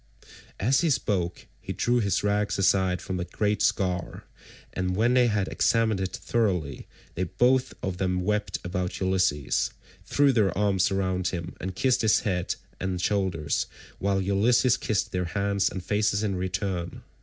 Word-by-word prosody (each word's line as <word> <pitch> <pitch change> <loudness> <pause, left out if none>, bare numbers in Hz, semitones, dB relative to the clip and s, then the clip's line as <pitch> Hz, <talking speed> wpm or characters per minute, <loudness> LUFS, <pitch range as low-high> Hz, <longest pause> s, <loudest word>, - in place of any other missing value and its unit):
As 130 - +3
he 170 - +2
spoke 90 - -1
he - - -6
drew 120 0 +1
his 100 -4 0
rags 105 0 0
aside 95 -2 +2
from 95 -1 -3
the 90 - -2
great 105 +2 -1
scar, 90 -2 0 0.5
and 90 0 -1
when 115 +5 +3
they 125 -1 +5
had 105 -4 0
examined 115 -3 +1
it 95 -1 -3
thoroughly, 90 - -1 0.3
they 90 - -1
both 125 +8 +2
of 95 -2 -2
them 90 -1 0
wept 105 +2 -1
about 90 0 -3
Ulysses, 95 -7 +1 0.3
threw 140 -1 +3
their 100 -7 +2
arms 95 -2 +2
round 95 -1 0
him, 85 -2 -4
and 95 0 -4
kissed 130 +4 +2
his 110 -2 +3
head 90 -4 -1 0.2
and 95 -1 -2
shoulders, 90 -6 0 0.3
while 100 0 +1
Ulysses 110 +6 +3
kissed 105 -3 -1
their 90 -1 -1
hands 100 +2 0
and 95 - -6
faces 105 +1 +1
in 100 -3 0
return. 90 -1 -3
95 Hz, 160 wpm, -26 LUFS, 90-105 Hz, 0.5 s, they